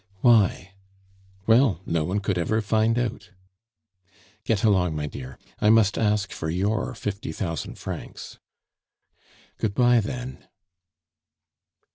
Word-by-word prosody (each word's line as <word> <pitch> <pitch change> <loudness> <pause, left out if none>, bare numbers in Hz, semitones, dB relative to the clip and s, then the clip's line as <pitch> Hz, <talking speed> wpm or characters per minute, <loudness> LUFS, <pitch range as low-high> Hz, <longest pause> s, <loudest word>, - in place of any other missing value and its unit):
"Why?" 100 -5 +3 0.7
"Well, 115 - +4
no 85 -2 0
one 95 +6 -1
could 95 -2 -1
ever 110 +6 +1
find 110 +2 +2
out." 120 -1 -3 1.2
"Get 110 -4 0
along, 90 -7 +3
my 75 -1 -2
dear! 65 -3 -8 0.2
I 105 - +3
must 110 -2 +5
ask 105 -2 +1
for 80 - -4
your 105 +8 -1
fifty 100 -6 -4
thousand 80 -1 -4
francs." - - -8 1.2
"Good 100 -3 -1
bye 120 -1 +5
then." 125 +4 -6
105 Hz, 115 wpm, -25 LUFS, 90-115 Hz, 1.2 s, must